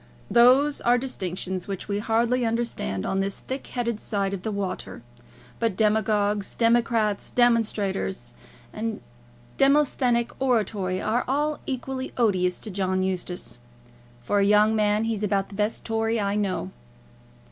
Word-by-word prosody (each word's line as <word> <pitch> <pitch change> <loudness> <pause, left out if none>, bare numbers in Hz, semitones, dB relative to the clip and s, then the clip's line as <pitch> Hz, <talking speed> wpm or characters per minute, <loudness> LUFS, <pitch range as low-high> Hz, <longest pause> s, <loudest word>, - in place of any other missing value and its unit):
"Those 260 +5 +5
are 240 +1 +4
distinctions 185 -7 -4
which 195 -2 -5
we 205 0 -1
hardly 235 +3 +1
understand 230 - -2
on 195 - 0
this 195 0 -1
thick 265 +1 -6
headed 235 -3 -2
side 200 -2 -1
of 195 - -4
the 220 - -3
water. 200 - -4 0.6
But 225 -5 0
demagogues, 210 -2 +1
democrats, 230 -3 +2
demonstrations, 205 - +1 0.4
and 220 0 -3 0.6
Demosthenic 270 -4 +3
oratory 210 -7 0
are 225 +5 0
all 295 +3 0
equally 265 0 -4
odious 185 -6 +2
to 215 - -5
John 185 -1 0
Eustace. 180 -7 -4 0.6
For 205 +11 +1
a - - +4
young 210 +2 +4
man 210 0 +2
he's 225 -2 -2
about 200 -2 0
the 200 - -10
best 210 +2 -1
Tory 225 0 0
I 200 -1 0
know." 195 - -1
215 Hz, 135 wpm, -25 LUFS, 195-235 Hz, 0.6 s, Those